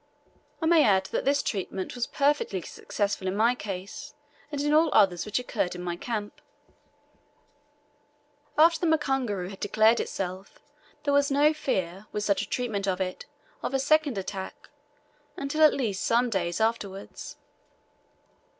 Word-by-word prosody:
I -, -, +2 dB
may 325 Hz, -1 st, +6 dB
add 190 Hz, -1 st, +3 dB
that -, -, -1 dB
this 280 Hz, +1 st, +2 dB
treatment 190 Hz, -2 st, -3 dB
was 245 Hz, -1 st, -2 dB
perfectly 285 Hz, -9 st, +1 dB
successful 200 Hz, -2 st, -3 dB
in 185 Hz, -, -1 dB
my 230 Hz, +3 st, +4 dB
case, 205 Hz, +6 st, -7 dB, 0.4 s
and 290 Hz, -, -3 dB
in 295 Hz, +1 st, +1 dB
all 315 Hz, +1 st, +5 dB
others 185 Hz, -1 st, +3 dB
which 210 Hz, -, -1 dB
occurred 205 Hz, -7 st, -2 dB
in 180 Hz, -, -6 dB
my 175 Hz, -1 st, -2 dB
camp. 210 Hz, +2 st, -5 dB, 2.2 s
After 325 Hz, +1 st, +6 dB
the 345 Hz, -, 0 dB
mukunguru 250 Hz, -11 st, -1 dB
had 195 Hz, -, -10 dB
declared 220 Hz, +3 st, +3 dB
itself, 185 Hz, +1 st, -5 dB, 0.5 s
there 285 Hz, -, +1 dB
was 285 Hz, 0 st, +4 dB
no 290 Hz, +2 st, +4 dB
fear, 195 Hz, -, -2 dB
with 210 Hz, -, -2 dB
such 200 Hz, -1 st, +2 dB
a -, -, -6 dB
treatment 215 Hz, -6 st, -2 dB
of 185 Hz, -1 st, 0 dB
it, 185 Hz, -1 st, -4 dB, 0.3 s
of -, -, -2 dB
a -, -, +2 dB
second 290 Hz, -3 st, +2 dB
attack, 190 Hz, 0 st, -6 dB, 0.7 s
until 280 Hz, +3 st, -2 dB
at 310 Hz, -, +8 dB
least 215 Hz, -8 st, -2 dB
some 240 Hz, +1 st, +2 dB
days 175 Hz, -4 st, -1 dB
afterwards. 210 Hz, -3 st, -3 dB
220 Hz, 150 wpm, -27 LUFS, 190-280 Hz, 2.2 s, at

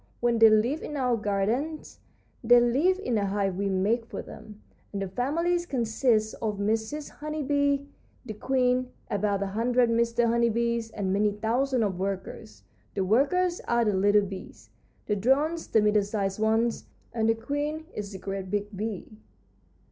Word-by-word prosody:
When 240 Hz, -1 st, +1 dB
they 225 Hz, 0 st, +8 dB
live 230 Hz, +8 st, +2 dB
in 295 Hz, -, -5 dB
our 250 Hz, -3 st, +1 dB
gardens 220 Hz, +9 st, -2 dB, 0.4 s
they 240 Hz, +1 st, +7 dB
live 275 Hz, +11 st, +2 dB
in 250 Hz, -, -1 dB
a 200 Hz, -, 0 dB
hive 195 Hz, -1 st, -1 dB
we 200 Hz, +1 st, -1 dB
make 210 Hz, +5 st, 0 dB
for -, -, -6 dB
them, 210 Hz, -1 st, -12 dB, 0.3 s
and 200 Hz, -, -4 dB
the 195 Hz, -, -2 dB
families 335 Hz, -, -1 dB
consist 225 Hz, -3 st, +1 dB
of 215 Hz, -2 st, -2 dB
Mrs. 220 Hz, +8 st, -2 dB
Honey 305 Hz, 0 st, -5 dB
Bee, 285 Hz, 0 st, +1 dB, 0.4 s
the 220 Hz, -, -5 dB
queen, 250 Hz, +2 st, +1 dB, 0.2 s
about 200 Hz, -1 st, 0 dB
a -, -, -1 dB
hundred 235 Hz, +4 st, +1 dB
Mr. 235 Hz, +1 st, +2 dB
Honey 235 Hz, 0 st, +2 dB
Bees, 235 Hz, 0 st, -1 dB
and 195 Hz, -3 st, -2 dB
many 205 Hz, +1 st, +2 dB
thousands 240 Hz, +4 st, 0 dB
of 190 Hz, -4 st, -2 dB
workers. 195 Hz, +3 st, -5 dB, 0.3 s
The 195 Hz, -2 st, 0 dB
workers 345 Hz, -, +2 dB
are 235 Hz, -1 st, +2 dB
the 210 Hz, -, +2 dB
little 205 Hz, +2 st, +3 dB
bees, 180 Hz, -, -10 dB, 0.3 s
the 210 Hz, -, 0 dB
drones 285 Hz, -, +1 dB
the 220 Hz, -, +3 dB
middle 210 Hz, 0 st, +4 dB
sized 200 Hz, -1 st, -2 dB
ones, 225 Hz, +2 st, +1 dB, 0.3 s
and 225 Hz, -1 st, +1 dB
the 225 Hz, -, +3 dB
queen 295 Hz, +6 st, -3 dB
is 205 Hz, -1 st, -5 dB
the 195 Hz, -, -7 dB
great 195 Hz, 0 st, -5 dB
big 205 Hz, +1 st, -3 dB
bee. 210 Hz, -1 st, -4 dB
225 Hz, 170 wpm, -27 LUFS, 205-255 Hz, 0.4 s, they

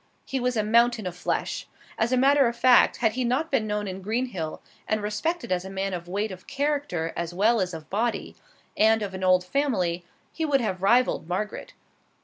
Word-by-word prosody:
He 270 Hz, -, -2 dB
was 250 Hz, -1 st, 0 dB
a 215 Hz, -, +2 dB
mountain 235 Hz, 0 st, +3 dB
of 180 Hz, -1 st, -4 dB
flesh. 180 Hz, -, -2 dB, 0.3 s
As 225 Hz, +2 st, 0 dB
a 255 Hz, -, +3 dB
matter 275 Hz, +1 st, +5 dB
of 235 Hz, -, -2 dB
fact, 250 Hz, +1 st, +5 dB
had 225 Hz, -4 st, +2 dB
he 255 Hz, +2 st, -1 dB
not 260 Hz, +7 st, 0 dB
been 230 Hz, -6 st, +1 dB
known 210 Hz, -1 st, -2 dB
in 190 Hz, 0 st, -6 dB
Greenhill 210 Hz, -6 st, -3 dB, 0.3 s
and 215 Hz, -, +1 dB
respected 215 Hz, -, -2 dB
as 180 Hz, -1 st, 0 dB
a 190 Hz, -, -8 dB
man 195 Hz, 0 st, -3 dB
of 175 Hz, -1 st, -5 dB
weight 205 Hz, +4 st, -2 dB
of 185 Hz, 0 st, -11 dB
character 280 Hz, -, -1 dB
as 170 Hz, 0 st, -4 dB
well 220 Hz, +3 st, +3 dB
as 180 Hz, -1 st, -1 dB
of 160 Hz, -3 st, -8 dB
body, 225 Hz, +4 st, -1 dB, 0.4 s
and 220 Hz, 0 st, +4 dB
of 195 Hz, -2 st, -5 dB
an 190 Hz, 0 st, -5 dB
old 185 Hz, -1 st, +4 dB
family, 180 Hz, -9 st, 0 dB, 0.3 s
he 325 Hz, -, -3 dB
would 290 Hz, -3 st, +2 dB
have 190 Hz, -6 st, -2 dB
rivaled 240 Hz, -2 st, +3 dB
Margaret. 210 Hz, +4 st, -4 dB
215 Hz, 205 wpm, -26 LUFS, 185-250 Hz, 0.4 s, matter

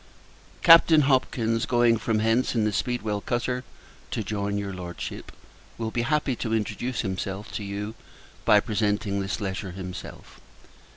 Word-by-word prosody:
Captain 165 Hz, -2 st, +8 dB
Hopkins, 120 Hz, -4 st, +1 dB
going 120 Hz, -1 st, +4 dB
from 110 Hz, 0 st, 0 dB
hence 115 Hz, +4 st, +2 dB
in 115 Hz, -, +2 dB
the 105 Hz, -, +1 dB
Speedwell 110 Hz, -3 st, -1 dB
cutter 125 Hz, +2 st, -2 dB, 0.5 s
to 110 Hz, -, -2 dB
join 100 Hz, 0 st, -2 dB
your 100 Hz, -1 st, -3 dB
Lordship, 90 Hz, -1 st, -7 dB, 0.5 s
will 110 Hz, -1 st, -3 dB
be 120 Hz, -, 0 dB
happy 140 Hz, +1 st, +1 dB
to 115 Hz, -1 st, -1 dB
introduce 120 Hz, +3 st, -2 dB
himself 95 Hz, 0 st, -4 dB
to 105 Hz, -, -4 dB
you 100 Hz, +2 st, -4 dB, 0.5 s
by 105 Hz, -, +6 dB
presenting 105 Hz, -2 st, 0 dB
this 95 Hz, +2 st, -3 dB
letter 95 Hz, -2 st, -4 dB
himself. 90 Hz, -1 st, -9 dB
110 Hz, 140 wpm, -26 LUFS, 100-120 Hz, 0.5 s, Captain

